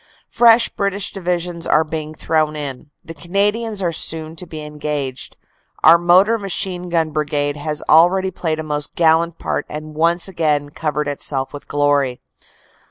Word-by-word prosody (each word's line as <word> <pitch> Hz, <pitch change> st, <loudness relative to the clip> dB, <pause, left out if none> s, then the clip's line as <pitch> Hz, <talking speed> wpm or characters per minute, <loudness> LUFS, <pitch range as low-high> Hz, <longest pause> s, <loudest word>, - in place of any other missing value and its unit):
Fresh 235 Hz, 0 st, +5 dB
British 200 Hz, 0 st, -1 dB
Divisions 175 Hz, -2 st, -3 dB
are 155 Hz, -, +4 dB
being 155 Hz, 0 st, -6 dB
thrown 155 Hz, -1 st, 0 dB
in. 145 Hz, -1 st, -6 dB, 0.2 s
The 165 Hz, -, -8 dB
Canadians 200 Hz, +6 st, -1 dB
are 175 Hz, -, +1 dB
soon 160 Hz, 0 st, -2 dB
to 180 Hz, -, -7 dB
be 155 Hz, -2 st, -7 dB
engaged. 150 Hz, -3 st, -4 dB, 0.5 s
Our 165 Hz, +2 st, +8 dB
Motor 185 Hz, +6 st, +4 dB
Machine 185 Hz, -2 st, -3 dB
Gun 165 Hz, -2 st, 0 dB
Brigade 145 Hz, -1 st, -1 dB
has 150 Hz, +1 st, -4 dB
already 185 Hz, +4 st, +4 dB
played 160 Hz, -3 st, -2 dB
a -, -, -3 dB
most 150 Hz, -1 st, -4 dB
gallant 165 Hz, 0 st, +2 dB
part -, -, -3 dB
and 155 Hz, +1 st, -7 dB
once 170 Hz, +4 st, +1 dB
again 150 Hz, -5 st, -1 dB
covered 150 Hz, -1 st, -2 dB
itself 135 Hz, -1 st, -2 dB
with 145 Hz, -, -9 dB
glory. 145 Hz, -3 st, +1 dB
160 Hz, 155 wpm, -19 LUFS, 150-180 Hz, 0.5 s, Our